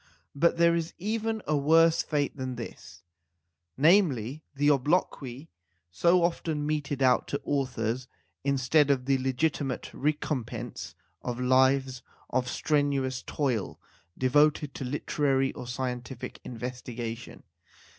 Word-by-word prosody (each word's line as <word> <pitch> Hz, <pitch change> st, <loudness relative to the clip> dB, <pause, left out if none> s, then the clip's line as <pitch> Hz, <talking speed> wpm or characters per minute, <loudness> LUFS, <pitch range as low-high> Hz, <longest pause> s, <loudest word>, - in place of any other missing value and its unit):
But 170 Hz, +4 st, +2 dB
there 170 Hz, 0 st, +5 dB
is 170 Hz, 0 st, -2 dB
even 220 Hz, +3 st, -2 dB
a 150 Hz, -, +1 dB
worse 165 Hz, +3 st, +4 dB
fate 145 Hz, -2 st, -1 dB
than 130 Hz, -2 st, -4 dB
this, 120 Hz, -1 st, -9 dB, 0.7 s
namely, 150 Hz, -, +3 dB
the 145 Hz, +1 st, +4 dB
obloquy 140 Hz, -1 st, -1 dB, 0.4 s
so 175 Hz, -, +3 dB
often 160 Hz, -3 st, -1 dB
meted 145 Hz, -2 st, -1 dB
out 125 Hz, -1 st, +3 dB
to 140 Hz, -, -3 dB
authors 125 Hz, -3 st, -1 dB, 0.4 s
instead 140 Hz, +2 st, +3 dB
of 130 Hz, -3 st, +2 dB
the 135 Hz, 0 st, +2 dB
legiti 135 Hz, +4 st, 0 dB
mate 130 Hz, -2 st, -4 dB
recompense 125 Hz, -5 st, -3 dB, 0.3 s
of 125 Hz, -1 st, -4 dB
lives 130 Hz, 0 st, +3 dB, 0.3 s
of 125 Hz, 0 st, 0 dB
strenuous 140 Hz, -3 st, 0 dB
toil 125 Hz, -9 st, -2 dB, 0.4 s
devoted 145 Hz, +2 st, +3 dB
to -, -, -6 dB
literary 135 Hz, 0 st, 0 dB
or 125 Hz, -, -8 dB
scientific 125 Hz, -1 st, -5 dB
investigation. 120 Hz, -1 st, -6 dB
135 Hz, 115 wpm, -28 LUFS, 125-150 Hz, 0.7 s, there